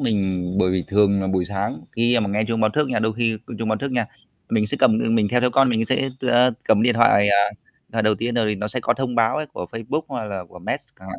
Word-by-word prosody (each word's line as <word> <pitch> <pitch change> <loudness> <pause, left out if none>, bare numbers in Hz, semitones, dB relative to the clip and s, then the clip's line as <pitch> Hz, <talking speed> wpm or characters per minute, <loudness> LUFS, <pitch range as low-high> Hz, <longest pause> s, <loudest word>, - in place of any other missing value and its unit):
mình 95 -7 0 0.2
bởi 90 - +3
vì 90 -1 -1
thường 100 -1 +3
là - - -2
buổi 95 -1 0
sáng 100 0 -3
khi 120 +1 +2
mà 105 - -1
nghe 105 +2 0
chuông 115 -1 -1
báo 110 0 +3
thức 150 -2 +1
nha, 125 - 0
đôi 110 +1 0
khi 115 -2 0 0.2
chuông 115 -1 -3
báo 110 0 0
thức 140 - -4
nha, 120 -3 0 0.4
mình 105 -2 +1
sẽ - - -4
cầm, 115 -5 +4
ừm, 115 - +1
mình 105 -2 +2
theo 125 - +2
theo 125 0 +2
con 135 +1 +4
mình 115 -1 +1
sẽ, 135 +1 +1
a, 125 0 +4 0.2
cầm 110 -1 +4
điện 120 0 +3
thoại, 105 -3 +4
à, 100 0 +3 0.4
à, 115 - 0
đầu 110 0 +3
tiên, 115 +4 -3
rồi 115 -2 +1
thì - - 0
nó 105 +1 -4
sẽ 125 +4 -4
có - - +1
thông 130 -2 -3
báo 115 +2 +2
ấy 155 0 -3
của 90 - -6
Facebook, 115 +7 -3
hoặc 125 -5 -4
là 100 -3 -5
của - - -13
Messenger - - -3 0.2
chẳng 95 - -12
hạn. - - -7
110 Hz, 290 wpm, -22 LUFS, 100-120 Hz, 0.4 s, cầm